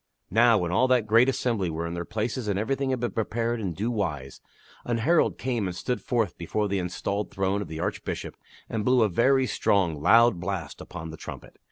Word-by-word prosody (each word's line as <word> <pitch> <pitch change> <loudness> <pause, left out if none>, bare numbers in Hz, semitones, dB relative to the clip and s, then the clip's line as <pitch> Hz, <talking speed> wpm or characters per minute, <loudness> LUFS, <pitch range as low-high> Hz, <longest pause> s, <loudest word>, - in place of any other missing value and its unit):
Now, 115 +2 +5
when 85 -3 -1
all 130 +8 +3
that 125 -4 +3
great 115 +4 +5
assembly 115 -8 0
were 80 +1 -3
in 85 - -4
their 85 0 -4
places 110 +3 -3
and 100 -2 0
everything 135 +6 -1
had 130 -1 0
been 120 - -1
prepared 115 +1 -1
in 95 -5 -2
due 110 +8 -2
wise, 75 - -3 0.4
an 120 -1 -1
herald 160 +9 +2
came 120 -5 -1
and 90 - -5
stood 125 +7 -2
forth 115 -7 -1
before 105 +5 -1
the 100 -1 -1
enstalled 100 +3 -3
throne 95 +1 -1
of - - -5
the 80 0 -7
Archbishop - - -4 0.3
and 110 -2 -2
blew 125 0 +4
a 110 - +2
very 130 +8 +3
strong, 90 - +1
loud 115 +2 +5
blast 95 -3 -4
upon 80 0 -8
a - - -8
trumpet. - - -10
105 Hz, 210 wpm, -26 LUFS, 90-120 Hz, 0.4 s, Now